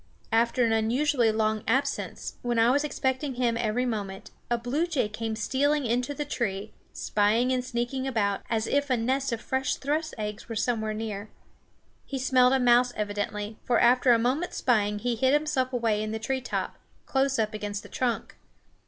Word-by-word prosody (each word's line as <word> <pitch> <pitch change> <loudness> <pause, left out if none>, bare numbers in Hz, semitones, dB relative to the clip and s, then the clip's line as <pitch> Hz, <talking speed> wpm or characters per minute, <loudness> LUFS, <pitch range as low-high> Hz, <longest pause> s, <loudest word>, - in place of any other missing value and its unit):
After 235 +2 +3
an 225 - +2
unusually 235 +2 +2
long 215 0 0
absence, 270 +5 -1
when 240 -1 -1
I 230 +2 +5
was 285 +3 +2
expecting 265 -1 -1
him 240 -2 +1
every 235 +2 0
moment, 200 -5 -4 0.2
a 240 - +2
blue 260 +9 -1
jay 290 -10 0
came 220 +1 -4
stealing 275 +6 +1
into 245 +5 0
the 295 - -3
tree, 210 -6 -3 0.2
spying 220 +5 +1
and 255 -1 0
sneaking 255 +1 -2
about, 205 -6 0
as 225 -1 0
if 285 0 0
a 255 - +2
nest 260 +4 0
of 230 - -2
fresh 265 0 -1
thrush's 310 +3 -2
eggs 210 0 -5
were 225 - -4
somewhere 220 -1 -1
near. 215 -1 -5 0.7
He 275 - -5
smelled 255 -1 +4
a 265 - +3
mouse 245 0 +4
evidently, 210 +1 -3
for 245 - +2
after 250 +1 +5
a 235 - +6
moment's 260 +9 -1
spying 210 -4 +2
he 240 +3 -1
hid 260 +4 +2
himself 290 -4 +1
away 230 -4 +1
in 215 - -3
the 220 - -2
tree 260 +4 -2
top, 255 - -3 0.3
close 270 0 +1
up 215 -1 0
against 205 -1 -4
the - - -11
trunk. 245 -3 -2
240 Hz, 185 wpm, -27 LUFS, 220-265 Hz, 0.7 s, a